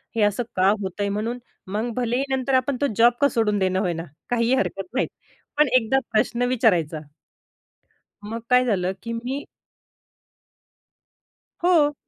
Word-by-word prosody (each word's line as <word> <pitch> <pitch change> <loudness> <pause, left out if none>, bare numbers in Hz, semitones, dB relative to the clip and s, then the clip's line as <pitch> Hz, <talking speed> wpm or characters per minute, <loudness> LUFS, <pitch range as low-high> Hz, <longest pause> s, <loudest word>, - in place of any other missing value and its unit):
हे 225 - +1
असं 205 +3 +2
का 190 +1 +4
होतंय 200 +2 -2
म्हणून? 225 +4 -2 0.3
मग 215 +5 -2
भलेही 245 +2 0
नंतर 265 0 -1
आपण 255 0 +2
तो 285 - +3
जॉब 235 +1 +6
का 285 - +6
सोडून 210 -4 +1
देईना 185 0 +1
होय 180 -4 0
ना, 165 0 -5 0.3
काहीही 240 +1 +2
हरकत 195 -7 -2
नाही. 265 - +1 0.5
पण 300 -1 +5
एकदा 255 +3 +2
प्रश्न 230 +2 +1
विचारायचा. 180 - +2 1.2
मग 225 +2 -5
काय 250 0 +5
झालं, 190 -5 0
की 230 0 -4
मी 255 +5 -4 2.2
हो. 315 -5 +4
230 Hz, 145 wpm, -23 LUFS, 200-255 Hz, 2.2 s, जॉब